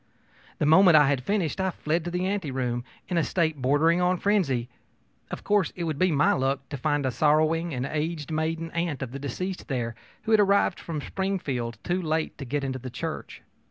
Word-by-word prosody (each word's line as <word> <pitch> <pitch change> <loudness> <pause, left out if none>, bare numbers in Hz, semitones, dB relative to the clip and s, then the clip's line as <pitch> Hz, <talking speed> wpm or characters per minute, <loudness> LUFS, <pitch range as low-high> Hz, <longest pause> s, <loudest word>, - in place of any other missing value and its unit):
The - - 0
moment 165 +2 +7
I 145 -2 +5
had 140 -3 +1
finished, 190 0 -1
I 190 - +1
fled 165 -1 -1
to - - -2
the 180 +1 -2
anteroom 130 -11 -2 0.2
in 175 -2 +1
a - - +2
state 160 -5 0
bordering 155 +7 +3
on 180 +1 +2
frenzy. 165 - +1 0.6
Of - - -6
course 205 -5 +2
it 175 - -4
would 155 -3 -2
be 185 -1 +3
my 145 -1 +3
luck 135 0 -1
to 140 - -4
find 145 +1 0
a 130 - +1
sorrowing 155 +5 +2
and 130 -2 -2
aged 155 +1 -3
maiden 160 +1 -2
aunt 170 -5 -2
of 125 - -6
the 140 - -6
deceased 180 +7 -4
there, 120 -5 -2 0.3
who 225 - -2
had 220 - +6
arrived 200 0 +3
from 160 -3 -5
Springfield 140 - -3
too 180 +1 -1
late 160 -1 -1
to 135 - -5
get 140 +3 -2
into 130 -1 -3
the 130 +1 -7
church. - - -6
155 Hz, 205 wpm, -26 LUFS, 135-180 Hz, 0.6 s, moment